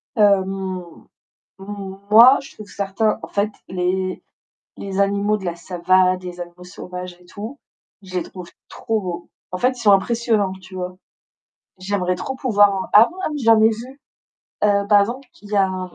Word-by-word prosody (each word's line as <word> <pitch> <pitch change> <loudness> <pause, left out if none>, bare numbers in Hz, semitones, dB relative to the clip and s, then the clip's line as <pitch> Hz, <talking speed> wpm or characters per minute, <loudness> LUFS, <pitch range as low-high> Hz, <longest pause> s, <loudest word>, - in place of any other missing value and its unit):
Hem, 190 -4 +1 0.6
moi, 200 +5 +4
je - - -13
trouve 215 -1 -11
certains, 205 +2 -1
en - - -7
fait, 205 +1 0 0.2
les 185 +1 -2 0.5
les 195 0 -4
animaux 200 +1 +1
de 200 - -9
la 175 -1 -3
savanne, 185 +1 +1
les 180 -1 -8
animaux 175 +1 -9
sauvages 180 0 -8
et 180 - -20
tout, 215 +9 -8 0.4
je 185 -1 -12
les - - -1
trouve 180 0 -10 0.2
trop 225 -1 -2
beaux, 175 -3 -6 0.2
en 185 - -3
fait, 255 +4 +1
ils - - -7
sont 205 - +5
impressionnants, 215 -1 +1
tu 190 0 -13
vois? 180 0 -5 0.8
J'aimerais 185 -1 -1
trop 265 +8 -5
pouvoir 205 -6 +2
ah 220 +3 +8
ouais, 360 - -15
ah - - 0
mais 295 - -4
j'en 225 -1 +6
ai 220 - +6
vu, 245 +5 -7 0.7
heu, 200 -1 +2
par 205 -1 +6
exemple, 245 +6 -3
il 205 - -13
y 210 - 0
a 195 - +4
un 185 -1 -5
195 Hz, 175 wpm, -21 LUFS, 185-215 Hz, 0.8 s, ah